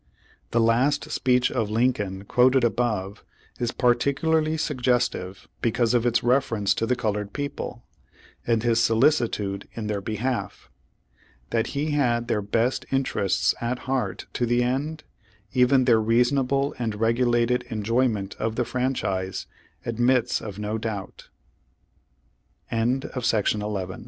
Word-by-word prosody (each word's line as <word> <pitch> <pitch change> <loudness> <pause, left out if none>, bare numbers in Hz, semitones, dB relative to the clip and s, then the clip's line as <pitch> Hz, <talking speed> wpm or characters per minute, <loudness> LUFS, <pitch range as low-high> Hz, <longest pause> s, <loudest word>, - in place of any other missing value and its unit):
The 115 - +1
last 120 +6 +2
speech 125 -1 +2
of 115 -5 -1
Lincoln, 105 -4 0
quoted 130 +3 +4
above, 110 -4 -1 0.4
is 120 -1 -1
par 125 -1 +3
ticularly 155 +5 0
suggestive 125 - -1
because 115 0 +1
of 120 0 +2
its 120 0 +1
reference 115 -5 +2
to 115 - -2
the 125 - +2
colored 105 -3 -2
people, 145 0 -5 0.6
and 115 -1 +2
his 115 -1 +2
solicitude 115 -5 +1
in 115 - -5
their 105 -1 -2
behalf. 115 +5 -3 0.8
That 115 0 +1
he 150 +2 0
had 120 -5 +1
their 110 -4 0
best 115 +5 0
interests 135 -7 +1
at 120 +2 -1
heart 130 0 -2
to 120 - 0
the 120 +1 +2
end, 145 +6 -2 0.5
even 130 +1 +4
their 115 -3 +4
reasonable 130 +5 +2
and 115 -3 -2
regulated 120 +2 +2
enjoy 115 +4 +1
ment 100 -4 -3
of 110 0 -1
the 125 - 0
franchise, 105 -8 -2 0.4
admits 120 +1 +1
of 105 -3 -7
120 Hz, 120 wpm, -25 LUFS, 110-130 Hz, 0.8 s, quoted